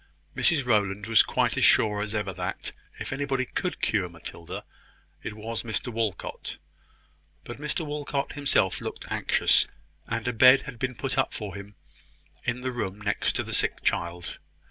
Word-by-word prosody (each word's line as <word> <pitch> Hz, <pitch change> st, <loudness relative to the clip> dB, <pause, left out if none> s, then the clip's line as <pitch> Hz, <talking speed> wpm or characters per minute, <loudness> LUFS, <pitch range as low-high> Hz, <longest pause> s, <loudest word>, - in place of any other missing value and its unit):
Mrs 155 Hz, -8 st, +3 dB
Rowland 105 Hz, -3 st, +2 dB
was 115 Hz, 0 st, +6 dB
quite -, -, +1 dB
as -, -, +2 dB
sure 105 Hz, -1 st, +5 dB
as 105 Hz, +1 st, -2 dB
ever 105 Hz, -3 st, -1 dB
that, 90 Hz, 0 st, -3 dB, 0.3 s
if -, -, -4 dB
anybody 135 Hz, -2 st, 0 dB
could 180 Hz, +8 st, -3 dB
cure 100 Hz, -5 st, +1 dB
Matilda, 85 Hz, 0 st, -7 dB, 0.6 s
it 105 Hz, -, -5 dB
was 110 Hz, +1 st, -3 dB
Mr 120 Hz, +2 st, -2 dB
Walcot; 110 Hz, -4 st, -3 dB, 0.9 s
but 120 Hz, -, -7 dB
Mr 150 Hz, +3 st, -2 dB
Walcot 145 Hz, -1 st, -2 dB
himself 140 Hz, -10 st, +2 dB
looked -, -, -5 dB
anxious; -, -, +4 dB, 0.4 s
and 115 Hz, +1 st, -2 dB
a 125 Hz, -, +1 dB
bed 130 Hz, +3 st, +7 dB
had 135 Hz, -5 st, -8 dB
been 130 Hz, 0 st, -1 dB
put 135 Hz, +2 st, -2 dB
up 135 Hz, -, +1 dB
for 105 Hz, -4 st, -5 dB
him 100 Hz, +1 st, -9 dB, 0.7 s
in 125 Hz, -, -1 dB
the 130 Hz, 0 st, -1 dB
room 100 Hz, -5 st, -3 dB
next 105 Hz, 0 st, 0 dB
to -, -, 0 dB
the -, -, -6 dB
sick -, -, +1 dB
child. 85 Hz, 0 st, -1 dB
115 Hz, 165 wpm, -27 LUFS, 100-135 Hz, 0.9 s, bed